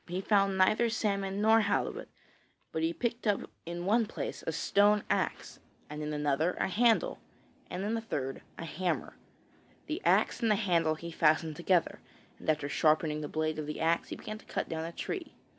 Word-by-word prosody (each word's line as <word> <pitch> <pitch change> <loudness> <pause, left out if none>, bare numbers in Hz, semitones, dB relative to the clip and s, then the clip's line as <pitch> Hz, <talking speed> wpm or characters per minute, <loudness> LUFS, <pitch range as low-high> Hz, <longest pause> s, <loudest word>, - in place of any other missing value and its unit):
He 180 +1 -3
found 195 -1 +2
neither 215 +5 +4
salmon 200 -3 -1
nor 220 +1 +6
halibut, 200 -1 -1 0.6
but 160 - -2
he 165 +1 +1
picked 235 +4 -2
up 205 -1 +2 0.3
in 175 +1 -4
one 220 +3 +3
place - - -5
a - - +1
stone 205 +1 +3
axe, - - -1 0.3
and 150 0 -5
in 150 0 -3
another 150 +3 +1
a - - +1
handle, 235 - +2 0.5
and 185 - -4
in 215 +3 0
a 225 - -2
third 135 -11 -4 0.2
a 165 - -5
hammer. 175 +3 -2 0.7
The 320 +4 -4
axe - - +3
and 230 - +2
the 210 - +5
handle 170 -6 +2
he 170 +2 -7
fastened 155 0 +2
together, 175 +1 +1 0.4
and - - -5
after 150 -2 +1
sharpening 155 +1 +2
the 150 - -4
blade 155 +1 -1
of 150 - -4
the 150 - -4
axe 165 +1 +1
he - - -4
began 215 0 -7
to - - -18
cut - - -3
down 160 0 -3
a 165 - -5
tree. 350 - -5
180 Hz, 190 wpm, -31 LUFS, 155-210 Hz, 0.7 s, nor